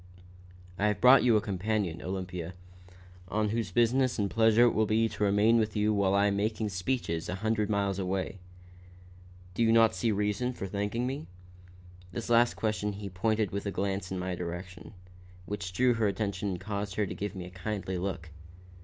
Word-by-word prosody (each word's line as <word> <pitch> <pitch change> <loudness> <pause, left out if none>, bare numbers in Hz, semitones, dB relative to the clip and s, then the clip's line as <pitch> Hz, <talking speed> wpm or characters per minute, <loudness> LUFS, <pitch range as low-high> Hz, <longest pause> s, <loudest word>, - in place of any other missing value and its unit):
"I 105 - +3
have 105 -2 0
brought 125 +4 +7
you 120 -3 +5
a - - +1
companion, 100 -3 -2
Olympia, 90 -1 -5 0.7
one 105 +2 0
whose 115 +1 -1
business 125 +2 +2
and 100 -3 -1
pleasure 115 +1 +5
it 120 - +5
will 110 0 +2
be 110 +2 +2
to 105 - -4
remain 105 +3 +4
with 110 -1 -1
you 105 0 +2
while 100 -1 +2
I 100 +1 +4
am 100 -1 +1
making 110 +1 -1
speeches 90 -4 -2
a 90 - -2
hundred 105 +1 0
miles 100 -2 0
away. 95 +1 -2 1.1
Do 105 - -3
you 115 -1 +4
not 115 -1 +5
see 100 +5 0
reason 105 +5 -1
for 100 - -6
thanking 105 +5 -2
me?" 135 +4 -4 0.8
This 120 +2 -5
last 120 +1 +4
question 105 -1 -1
he 100 0 -6
pointed 110 +2 0
with 100 +1 -3
a - - -1
glance 95 -1 -2
in 95 - -2
my 90 0 -3
direction, 90 +2 -7 0.5
which 100 -2 -5
drew 125 +6 +3
her 115 -2 +1
attention 100 0 -2
and 90 -2 -3
caused 100 0 -4
her 105 - +1
to - - -5
give 105 +1 -5
me 90 -2 -6
a 90 - -10
kindly 95 -1 -4
look. 90 -3 -4
105 Hz, 190 wpm, -29 LUFS, 95-110 Hz, 1.1 s, brought